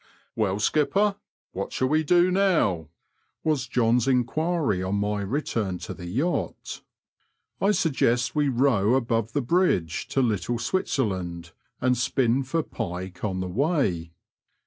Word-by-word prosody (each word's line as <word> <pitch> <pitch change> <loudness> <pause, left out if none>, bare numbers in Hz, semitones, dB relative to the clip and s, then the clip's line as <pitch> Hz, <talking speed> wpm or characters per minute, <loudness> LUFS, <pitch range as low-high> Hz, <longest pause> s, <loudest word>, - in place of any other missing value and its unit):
'* - - -40
Well, 100 -4 0
skipper, 195 - +2 0.3
what 100 - -4
shall 130 - 0
we 155 +2 +2
do 175 +3 +4
now? 170 - +2 0.2
'* - - -47
was 145 -5 0
John's 120 0 +2
enquiry 135 - +1
on 95 +2 -1
my 105 0 -1
return 105 -4 -2
to - - -7
the 90 - -9
yacht. 140 - -2 0.4
'* - - -46
I 195 - +3
suggest 125 - +1
we 145 -2 +2
row 120 -4 +3
above 115 -3 0
the 145 - 0
bridge 120 - +1
to 135 - 0
Litde 115 +1 -1
Switzer 135 0 0
land, 85 -4 -5 0.3
and 125 0 +2
spin 125 +1 +1
for 145 +5 -1
pike 90 -3 -6
on 95 -3 -1
the 95 - -3
way." 100 - 0
120 Hz, 150 wpm, -25 LUFS, 95-150 Hz, 0.4 s, do